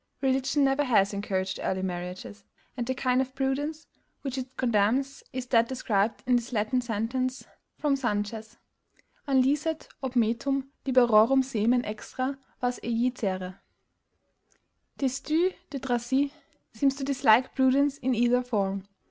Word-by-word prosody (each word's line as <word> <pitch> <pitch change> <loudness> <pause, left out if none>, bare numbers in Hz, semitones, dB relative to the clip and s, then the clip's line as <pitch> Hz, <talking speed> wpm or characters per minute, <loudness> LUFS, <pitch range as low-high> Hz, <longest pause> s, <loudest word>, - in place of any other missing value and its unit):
Religion 265 +2 +2
never 270 +1 +2
has 210 -7 +3
encouraged 190 -2 -2
early 190 0 -1
marriages; 180 +2 -5 0.3
and 240 -2 -3
the 260 - -1
kind 255 0 +2
of 260 0 -5
PRUDENCE 290 +4 -2 0.4
which 270 -3 -3
it 260 -1 -6
condemns 245 +4 +1
is 255 -1 -4
that 235 -2 +3
described 225 -4 -1
in 250 -1 +4
this 240 +1 -5
Latin 225 +3 0
sentence 245 +3 -2 0.3
from 290 -2 +1
Sanchez, 220 -3 -3 0.7
An 265 -2 +4
licet 300 +4 -1
ob 260 -1 -3
metum 260 +4 +1 0.2
liberorum 250 0 +5
semen 245 -1 +1
extra 255 +6 -4 0.2
vas 245 0 -1
ejicere? 210 -6 -2 1.4
Destutt 300 +7 +1 0.2
de 280 - -5
Tracy 265 +2 0 0.4
seems 270 +4 +2
to 275 - -6
dislike 260 -3 +4
prudence 270 +2 +3
in 255 0 0
either 240 +2 +3
form. 200 -5 -2
250 Hz, 130 wpm, -27 LUFS, 220-270 Hz, 1.4 s, liberorum